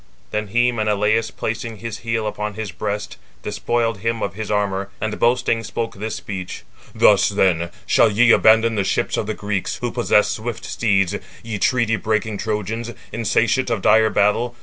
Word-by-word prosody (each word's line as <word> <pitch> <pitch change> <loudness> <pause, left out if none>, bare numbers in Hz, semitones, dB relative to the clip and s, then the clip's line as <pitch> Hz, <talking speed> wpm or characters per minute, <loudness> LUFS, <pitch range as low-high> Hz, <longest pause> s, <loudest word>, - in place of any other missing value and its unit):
Then 105 0 -2
he 120 +4 +2
(Menelaus) 110 0 +1
placing 115 0 -4
his 115 +1 -6
heel 115 -1 -2
upon 105 -1 -3
his 110 -3 -5
breast, 105 +3 -4 0.3
despoiled 115 -3 -1
him 115 +2 -2
of 95 - -2
his 110 +1 -6
armour, 100 -2 -1
and 110 0 -3
boasting, 120 -1 +2
spoke 115 +1 -4
[this] 105 +2 -5
speech: 95 -3 -6 0.3
"Thus, - - +5
438 - - -7
then, 85 -2 +2
shall 110 +1 +4
ye 115 +3 +5
abandon 110 +1 +5
the 100 -3 0
ships - - 0
of - - -2
the 110 - -2
Greeks, 100 -2 -2
who 120 -1 -3
possess 110 -3 +3
swift 115 +2 -5
steeds, 100 -4 +1 0.3
ye 110 -3 -4
treaty 115 -2 +2
breaking 110 -1 -1
Trojans, 110 +2 -3 0.2
insatiate 115 +3 +1
of 110 -5 -1
dire 110 0 +5
battle. 115 +4 +1
110 Hz, 170 wpm, -21 LUFS, 105-115 Hz, 0.3 s, Thus